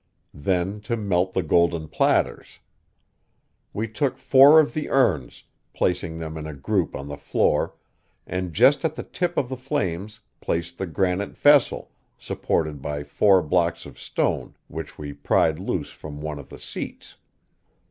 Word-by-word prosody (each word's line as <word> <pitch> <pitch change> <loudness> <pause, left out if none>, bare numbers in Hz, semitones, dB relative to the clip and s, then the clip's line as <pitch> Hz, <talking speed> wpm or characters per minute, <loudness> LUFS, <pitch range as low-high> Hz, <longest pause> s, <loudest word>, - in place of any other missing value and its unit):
Then 90 +6 -1
to 115 +2 -2
melt 95 -3 0
the 95 - +1
golden 85 -2 +2
platters. - - 0 1.1
We 110 +2 -3
took 120 +5 -1
four 135 +4 +7
of 155 - +2
the 155 -1 -3
urns, 80 - +1 0.3
placing 85 -2 -1
them 80 -1 -6
in 75 - -6
a 75 - -7
group 90 +6 -1
on 70 - -6
the 70 0 -6
floor, 70 - +1 0.5
and 90 0 -3
just 140 - +4
at 160 -1 0
the - - -5
tip 175 -1 -3
of 130 - +1
the 130 - -4
flames 105 -4 -3 0.2
placed 85 +1 -3
the 95 - -2
granite 90 +3 -1
vessel, 145 -2 +4 0.3
supported 75 -4 -2
by 75 0 -4
four 95 +5 +3
blocks 85 +2 0
of - - -12
stone - - -2
which - - -7
we 75 -1 -6
pried 75 +2 +1
loose 90 -6 -3
from 75 -1 -9
one 75 -1 -5
of 70 - -11
the - - -10
seats. - - -8
90 Hz, 160 wpm, -24 LUFS, 80-110 Hz, 1.1 s, four